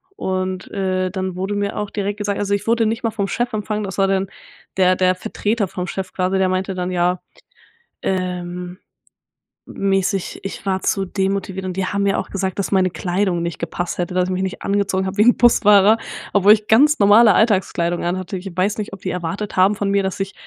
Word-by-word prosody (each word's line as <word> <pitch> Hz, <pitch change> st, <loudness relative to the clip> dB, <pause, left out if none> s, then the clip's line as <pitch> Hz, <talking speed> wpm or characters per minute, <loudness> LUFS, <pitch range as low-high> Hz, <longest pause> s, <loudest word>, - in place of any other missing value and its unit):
und, 185 Hz, -, -3 dB
äh, 185 Hz, -1 st, -1 dB
dann 185 Hz, -1 st, -3 dB
wurde 190 Hz, +3 st, -3 dB
mir 205 Hz, 0 st, -2 dB
auch 210 Hz, -1 st, -3 dB
direkt 205 Hz, 0 st, -3 dB
gesagt 205 Hz, -1 st, -2 dB
also, 200 Hz, 0 st, -1 dB
ich 200 Hz, +1 st, -2 dB
wurde 230 Hz, 0 st, +3 dB
nicht 225 Hz, +2 st, -1 dB
mal 230 Hz, -, 0 dB
vom 200 Hz, -2 st, -2 dB
Chef 240 Hz, +4 st, -2 dB
empfangen, 215 Hz, 0 st, -2 dB
das 190 Hz, -2 st, -6 dB
war 195 Hz, -1 st, +3 dB
dann 195 Hz, 0 st, 0 dB, 0.5 s
der 185 Hz, -1 st, +4 dB
der 185 Hz, 0 st, +2 dB
Vertreter 205 Hz, +3 st, -2 dB
vom 180 Hz, 0 st, -5 dB
Chef 185 Hz, +1 st, -5 dB
quasi, 185 Hz, +1 st, 0 dB
der 190 Hz, -1 st, +2 dB
meinte 185 Hz, +1 st, -2 dB
dann 180 Hz, 0 st, -3 dB
ja, 180 Hz, 0 st, +1 dB, 0.8 s
ähm, 180 Hz, -1 st, -3 dB, 0.9 s
m -, -, -11 dB, 0.2 s
mäßig, 195 Hz, -1 st, -1 dB
ich 195 Hz, +1 st, -7 dB
war 190 Hz, -1 st, 0 dB
zu 195 Hz, -1 st, 0 dB
demotiviert 190 Hz, 0 st, -2 dB
und 185 Hz, 0 st, -5 dB
die 190 Hz, -, 0 dB
haben 200 Hz, +1 st, -1 dB
mir 200 Hz, -1 st, +1 dB
auch -, -, -5 dB
gesagt 190 Hz, -1 st, -3 dB
dass 195 Hz, -, -2 dB
meine 185 Hz, -1 st, +3 dB
Kleidung 180 Hz, 0 st, -1 dB
nicht 170 Hz, -1 st, -4 dB
gepasst 170 Hz, +1 st, -4 dB
hätte, 175 Hz, 0 st, -2 dB
dass 180 Hz, 0 st, +2 dB
ich -, -, -3 dB
mich 185 Hz, +1 st, -1 dB
nicht 190 Hz, -1 st, -4 dB
angezogen 195 Hz, -1 st, 0 dB
habe 190 Hz, 0 st, -4 dB
wie -, -, +4 dB
'n 245 Hz, +2 st, +5 dB
Busfahrer 210 Hz, -3 st, +5 dB, 0.4 s
obwohl 205 Hz, 0 st, +6 dB
ich 215 Hz, -1 st, -2 dB
ganz 295 Hz, +7 st, +5 dB
normale 210 Hz, +2 st, +6 dB
Alltagskleidung 185 Hz, -5 st, +1 dB
an 175 Hz, +2 st, 0 dB
hatte. 185 Hz, +1 st, -5 dB
Ich 190 Hz, +1 st, -7 dB
weiß 195 Hz, +3 st, 0 dB
nicht, 210 Hz, -, -4 dB
ob 195 Hz, -, -8 dB
die 185 Hz, -, -3 dB
erwartet 180 Hz, +4 st, -4 dB
haben 190 Hz, +3 st, +4 dB
von 200 Hz, 0 st, -2 dB
mir, 200 Hz, 0 st, +2 dB
dass 190 Hz, 0 st, -3 dB
ich 195 Hz, 0 st, -3 dB
190 Hz, 220 wpm, -20 LUFS, 185-205 Hz, 0.9 s, obwohl